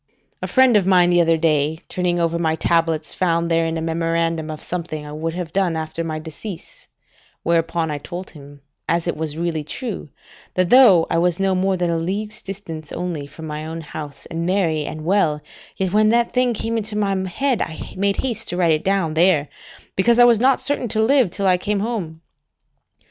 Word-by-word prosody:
A -, -, -2 dB
friend 260 Hz, -3 st, +4 dB
of 195 Hz, -3 st, +3 dB
mine 180 Hz, -2 st, +5 dB
the 175 Hz, 0 st, +5 dB
other 165 Hz, -1 st, +3 dB
day 155 Hz, -1 st, +1 dB
turning 180 Hz, -1 st, -1 dB
over 170 Hz, 0 st, 0 dB
my 160 Hz, -1 st, +1 dB
tablets, 165 Hz, -2 st, 0 dB
found 170 Hz, -2 st, 0 dB
therein 165 Hz, 0 st, +1 dB
a 160 Hz, -, -3 dB
memorandum 165 Hz, -1 st, -1 dB
of 155 Hz, -1 st, -5 dB
something 160 Hz, -4 st, -5 dB
I 150 Hz, -, -8 dB
would 160 Hz, +2 st, -4 dB
have 175 Hz, -3 st, -5 dB
done 190 Hz, -4 st, +1 dB
after 160 Hz, +1 st, -3 dB
my 160 Hz, -1 st, -3 dB
decease, 160 Hz, +4 st, -9 dB, 0.6 s
whereupon 165 Hz, -1 st, 0 dB
I 145 Hz, -, -3 dB
told 175 Hz, +5 st, -7 dB
him, 145 Hz, -2 st, -14 dB, 0.3 s
as 170 Hz, +1 st, +1 dB
it 170 Hz, -, -1 dB
was 155 Hz, -1 st, -4 dB
really 165 Hz, -2 st, -2 dB
true, 210 Hz, -, -6 dB, 0.5 s
that 185 Hz, 0 st, +1 dB
though 225 Hz, -10 st, +7 dB
I 165 Hz, -, +2 dB
was 175 Hz, +1 st, +1 dB
no 195 Hz, -1 st, +2 dB
more 190 Hz, +1 st, +1 dB
than 175 Hz, -1 st, 0 dB
a 165 Hz, -, 0 dB
league's 205 Hz, +5 st, -4 dB
distance 170 Hz, -6 st, -8 dB
only 170 Hz, -5 st, -4 dB
from 155 Hz, +3 st, -10 dB
my 150 Hz, 0 st, -5 dB
own 160 Hz, +1 st, -6 dB
house, 150 Hz, -2 st, -8 dB
and 165 Hz, 0 st, -4 dB
merry 170 Hz, -5 st, +1 dB
and 155 Hz, +1 st, -6 dB
well, 165 Hz, -5 st, +2 dB, 0.4 s
yet 190 Hz, -1 st, -1 dB
when 215 Hz, 0 st, +4 dB
that 235 Hz, +1 st, +2 dB
thing 250 Hz, -2 st, +2 dB
came 230 Hz, +2 st, -2 dB
into 210 Hz, 0 st, -5 dB
my 200 Hz, -2 st, +1 dB
head, 265 Hz, +5 st, 0 dB
I 160 Hz, -, -5 dB
made 200 Hz, +1 st, +1 dB
haste 225 Hz, -4 st, -2 dB
to 175 Hz, -, -3 dB
write 170 Hz, -3 st, +3 dB
it 155 Hz, 0 st, +1 dB
down 190 Hz, -5 st, +1 dB
there, 160 Hz, -3 st, +3 dB, 0.5 s
because 235 Hz, +5 st, +3 dB
I 245 Hz, -, +8 dB
was 235 Hz, -3 st, +5 dB
not 260 Hz, +2 st, +3 dB
certain 285 Hz, -4 st, -1 dB
to 220 Hz, 0 st, 0 dB
live 260 Hz, -3 st, +4 dB
till 195 Hz, +3 st, -3 dB
I 180 Hz, -1 st, +4 dB
came 205 Hz, +1 st, -1 dB
home. 190 Hz, -8 st, -4 dB
170 Hz, 205 wpm, -21 LUFS, 160-195 Hz, 0.6 s, I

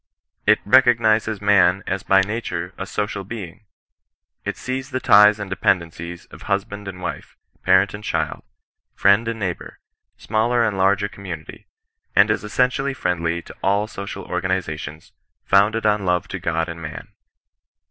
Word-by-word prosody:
It 105 Hz, 0 st, +5 dB
recognizes 110 Hz, -3 st, +3 dB
man 95 Hz, -2 st, +4 dB
as 95 Hz, +1 st, -2 dB
by 95 Hz, 0 st, +4 dB
nature 95 Hz, -4 st, -4 dB
a 95 Hz, -, -6 dB
social 105 Hz, -1 st, -3 dB
being. 100 Hz, -2 st, -8 dB, 0.8 s
It -, -, -4 dB
sees 130 Hz, 0 st, -4 dB
the 130 Hz, -, -2 dB
ties 105 Hz, -3 st, +6 dB
and 105 Hz, -, -4 dB
dependencies 85 Hz, -2 st, -1 dB
of -, -, -12 dB
husband 100 Hz, +1 st, -3 dB
and 90 Hz, -1 st, -7 dB
wife, -, -, -6 dB, 0.2 s
parent 95 Hz, 0 st, +3 dB
and 105 Hz, +1 st, -8 dB
child, -, -, -2 dB, 0.5 s
friend 100 Hz, +4 st, +4 dB
and 115 Hz, -1 st, -3 dB
neighbour, 95 Hz, -4 st, -4 dB, 0.4 s
smaller 115 Hz, +2 st, +1 dB
and 105 Hz, -3 st, -1 dB
larger 100 Hz, +1 st, +2 dB
community; 90 Hz, -6 st, -9 dB, 0.5 s
and 100 Hz, +2 st, +5 dB
is 105 Hz, -, -1 dB
essentially 125 Hz, +5 st, 0 dB
friendly 85 Hz, -5 st, -1 dB
to -, -, -12 dB
all 100 Hz, +2 st, +2 dB
social 100 Hz, -2 st, -7 dB
or 90 Hz, -, -3 dB
ganizations, 80 Hz, -5 st, -4 dB, 0.3 s
founded 110 Hz, +3 st, +3 dB
on 105 Hz, -1 st, +2 dB
love 90 Hz, -2 st, 0 dB
to -, -, -5 dB
God 80 Hz, +1 st, -1 dB
and 85 Hz, -1 st, -7 dB
man. 75 Hz, -2 st, -8 dB
100 Hz, 150 wpm, -21 LUFS, 90-110 Hz, 0.8 s, ties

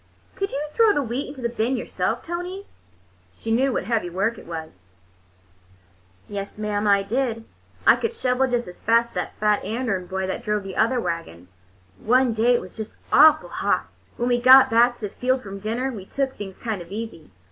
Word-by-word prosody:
"Could 395 Hz, 0 st, -2 dB
you 275 Hz, -, -3 dB
throw 450 Hz, -3 st, +5 dB
the 290 Hz, -, 0 dB
wheat 250 Hz, +4 st, -3 dB
into 275 Hz, -3 st, -9 dB
the -, -, +2 dB
bin 235 Hz, +2 st, -1 dB
yourself, -, -, -2 dB
Tony?" 355 Hz, +3 st, -5 dB, 0.7 s
She 225 Hz, -, -6 dB
knew 260 Hz, +4 st, +3 dB
what -, -, -1 dB
heavy 215 Hz, -3 st, -1 dB
work 195 Hz, +6 st, -1 dB
it -, -, -14 dB
was. 160 Hz, -, -8 dB, 1.4 s
"Yes, 200 Hz, 0 st, -6 dB
mam, 210 Hz, -1 st, -1 dB
I 200 Hz, -1 st, +4 dB
did. 230 Hz, +1 st, -2 dB, 0.4 s
I -, -, +8 dB
could 460 Hz, -, -1 dB
shovel 265 Hz, -, +1 dB
just 245 Hz, -1 st, -1 dB
as 180 Hz, -, -11 dB
fast 230 Hz, +1 st, +3 dB
as -, -, -23 dB
that -, -, -4 dB
fat 210 Hz, -1 st, +2 dB
Andern 210 Hz, -4 st, -2 dB
boy 190 Hz, +1 st, -2 dB
that 190 Hz, -, -3 dB
drove 210 Hz, -3 st, -1 dB
the 195 Hz, -1 st, -7 dB
other 245 Hz, +3 st, +2 dB
wagon. 165 Hz, -, -5 dB, 0.5 s
One 250 Hz, +1 st, +3 dB
day 235 Hz, +3 st, +3 dB
it -, -, 0 dB
was 185 Hz, -, -12 dB
just 220 Hz, -1 st, -7 dB, 0.2 s
awful 310 Hz, 0 st, +6 dB
hot. -, -, -1 dB, 0.3 s
When 240 Hz, -, -1 dB
we 245 Hz, 0 st, +2 dB
got 260 Hz, +1 st, +8 dB
back 240 Hz, +2 st, +4 dB
to -, -, -20 dB
the 210 Hz, -, -3 dB
field 255 Hz, +4 st, -1 dB
from 195 Hz, -1 st, -7 dB
dinner, 235 Hz, +6 st, -2 dB
we 205 Hz, -6 st, -8 dB
took 270 Hz, -1 st, -2 dB
things 195 Hz, -2 st, -8 dB
kind 220 Hz, -5 st, -4 dB
of 170 Hz, +1 st, -12 dB
easy. 215 Hz, -7 st, -6 dB
230 Hz, 200 wpm, -23 LUFS, 200-255 Hz, 1.4 s, I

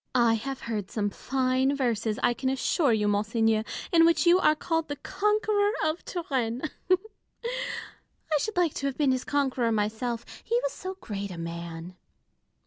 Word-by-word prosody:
I 235 Hz, -2 st, +5 dB
have 265 Hz, +4 st, -3 dB
heard 210 Hz, -4 st, -3 dB
some 205 Hz, -2 st, -1 dB
fine 260 Hz, +2 st, +1 dB
verses, 225 Hz, -5 st, 0 dB
I 240 Hz, -, +4 dB
can 260 Hz, +2 st, -1 dB
assure 270 Hz, +2 st, +2 dB
you, 210 Hz, -2 st, +2 dB
monseigneur, 215 Hz, +1 st, +2 dB, 0.3 s
in 330 Hz, -2 st, +6 dB
which 330 Hz, -2 st, +4 dB
you 350 Hz, +2 st, +6 dB
are 305 Hz, -4 st, +4 dB
called 325 Hz, +1 st, -1 dB
the 290 Hz, -, -3 dB
conqueror 420 Hz, +5 st, +1 dB
of 315 Hz, +2 st, 0 dB
Turenne. 260 Hz, -9 st, -2 dB, 0.3 s
I 440 Hz, -3 st, -3 dB
should 435 Hz, +5 st, -3 dB
like 345 Hz, -4 st, +3 dB
to 275 Hz, -, -2 dB
have 270 Hz, -, -3 dB
been 285 Hz, -3 st, +3 dB
his 255 Hz, -1 st, 0 dB
conqueror 265 Hz, -5 st, +1 dB
myself, 225 Hz, +2 st, -1 dB, 0.2 s
he 470 Hz, +1 st, +1 dB
was -, -, 0 dB
so 375 Hz, 0 st, -6 dB
great 200 Hz, -1 st, -4 dB
a 180 Hz, -, -7 dB
man. 170 Hz, +1 st, -6 dB
260 Hz, 165 wpm, -28 LUFS, 220-330 Hz, 0.3 s, in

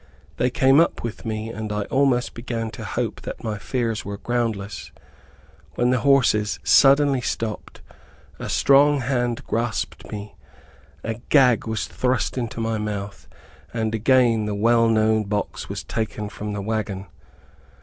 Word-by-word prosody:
They 125 Hz, -, +2 dB
came 135 Hz, +3 st, +4 dB
up 165 Hz, -, +2 dB
with 115 Hz, 0 st, -6 dB
me, 110 Hz, 0 st, -3 dB
and 110 Hz, -2 st, -5 dB
I 105 Hz, 0 st, -1 dB
almost 135 Hz, -1 st, +1 dB
began 115 Hz, -2 st, -4 dB
to -, -, -8 dB
hope -, -, -3 dB
that -, -, -7 dB
my 110 Hz, -3 st, -3 dB
fears 115 Hz, -1 st, -2 dB
were 100 Hz, 0 st, -5 dB
groundless, 110 Hz, -4 st, -3 dB, 0.8 s
when 120 Hz, +1 st, +2 dB
the 125 Hz, -, +2 dB
horses 120 Hz, -7 st, +3 dB
suddenly 140 Hz, -1 st, +5 dB
stopped, 115 Hz, -2 st, -4 dB, 0.6 s
a -, -, -5 dB
strong 140 Hz, +1 st, +4 dB
hand 120 Hz, -2 st, -1 dB
grasped 115 Hz, 0 st, -3 dB
me, 105 Hz, 0 st, -7 dB, 0.7 s
a 115 Hz, +1 st, -4 dB
gag 125 Hz, -6 st, +4 dB
was 110 Hz, -1 st, -2 dB
thrust 130 Hz, 0 st, -1 dB
into 120 Hz, -3 st, -4 dB
my 115 Hz, -1 st, -1 dB
mouth, 100 Hz, -2 st, -5 dB, 0.5 s
and 110 Hz, -1 st, -1 dB
again 115 Hz, -1 st, +3 dB
the 105 Hz, -1 st, -2 dB
well 115 Hz, +2 st, +3 dB
known 110 Hz, -1 st, +2 dB
box 100 Hz, +1 st, -3 dB
was -, -, -5 dB
taken 105 Hz, -1 st, -3 dB
from 105 Hz, +1 st, -6 dB
the 100 Hz, -1 st, -4 dB
wagon. 105 Hz, -3 st, -3 dB
115 Hz, 150 wpm, -23 LUFS, 105-125 Hz, 0.8 s, suddenly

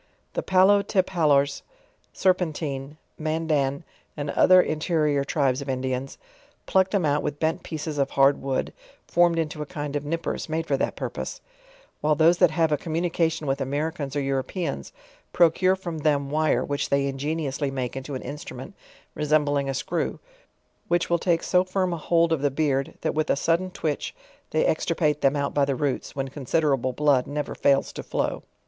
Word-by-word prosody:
The -, -, -1 dB
PalJotepaUors, 185 Hz, -7 st, +3 dB, 0.5 s
Serpentine, 155 Hz, -6 st, -1 dB, 0.2 s
Mandan, 155 Hz, -2 st, 0 dB, 0.3 s
and 145 Hz, -1 st, -3 dB
other 185 Hz, 0 st, +6 dB
interi 155 Hz, -1 st, 0 dB
or 140 Hz, -, +1 dB
tribes 140 Hz, -2 st, 0 dB
of 140 Hz, -, -6 dB
Indians, 130 Hz, 0 st, -3 dB, 0.5 s
pluck 190 Hz, 0 st, +3 dB
them, 195 Hz, -5 st, +1 dB
out 145 Hz, 0 st, +2 dB
with 145 Hz, 0 st, -4 dB
bent 160 Hz, +3 st, 0 dB
pieces 155 Hz, -2 st, -5 dB
of 140 Hz, 0 st, +1 dB
hard 135 Hz, +1 st, +3 dB
wood, 135 Hz, -1 st, -2 dB, 0.3 s
formed 175 Hz, -1 st, +3 dB
into 160 Hz, -1 st, -2 dB
a 150 Hz, -, -4 dB
kind 145 Hz, -4 st, -5 dB
of 145 Hz, -, -1 dB
nippers, 165 Hz, +2 st, -3 dB
made 160 Hz, +1 st, -1 dB
for 145 Hz, -, +1 dB
that -, -, -1 dB
purpose; -, -, -5 dB, 0.6 s
while 150 Hz, 0 st, +2 dB
those 165 Hz, +3 st, +4 dB
that 180 Hz, -, +6 dB
have 160 Hz, 0 st, +1 dB
a 150 Hz, -, +3 dB
communication 165 Hz, -1 st, -1 dB
with 135 Hz, 0 st, -1 dB
Americans 145 Hz, +1 st, -2 dB
or 145 Hz, -, +1 dB
Europeans, 135 Hz, -, -3 dB, 0.4 s
procure 180 Hz, +2 st, +4 dB
from 175 Hz, -4 st, -6 dB
them 145 Hz, -2 st, +1 dB
wire, 155 Hz, +1 st, +2 dB
which 145 Hz, 0 st, -2 dB
they 140 Hz, 0 st, +2 dB
ingeniously 140 Hz, 0 st, -2 dB
make 130 Hz, -2 st, -3 dB
into 135 Hz, +1 st, -5 dB
an 130 Hz, -, -5 dB
instrument 145 Hz, +3 st, -8 dB, 0.4 s
resembling 145 Hz, -2 st, +1 dB
a -, -, -1 dB
screw, -, -, -2 dB, 0.7 s
which 175 Hz, 0 st, 0 dB
will 170 Hz, -, +3 dB
take 170 Hz, -1 st, +1 dB
so 180 Hz, 0 st, +3 dB
firm 185 Hz, -1 st, -1 dB
a -, -, -3 dB
hold 165 Hz, +1 st, +2 dB
of 155 Hz, -, -1 dB
the 145 Hz, -, +2 dB
beard, 135 Hz, -1 st, -1 dB
that -, -, -1 dB
with 155 Hz, 0 st, -1 dB
a -, -, +4 dB
sudden 165 Hz, +6 st, +1 dB
twitch 155 Hz, -4 st, -3 dB, 0.3 s
they -, -, +1 dB
extirpate 150 Hz, -, +1 dB
them 135 Hz, +1 st, +3 dB
out 140 Hz, -1 st, -1 dB
by 145 Hz, -, +2 dB
the 140 Hz, -1 st, +1 dB
roots, 140 Hz, 0 st, -2 dB
when 135 Hz, -1 st, -2 dB
considerable 135 Hz, -1 st, 0 dB
blood 140 Hz, -1 st, +2 dB
ne 150 Hz, +1 st, -2 dB
ver -, -, -7 dB
fails 140 Hz, -1 st, +2 dB
to -, -, -5 dB
flow. -, -, -2 dB
150 Hz, 175 wpm, -25 LUFS, 140-165 Hz, 0.7 s, other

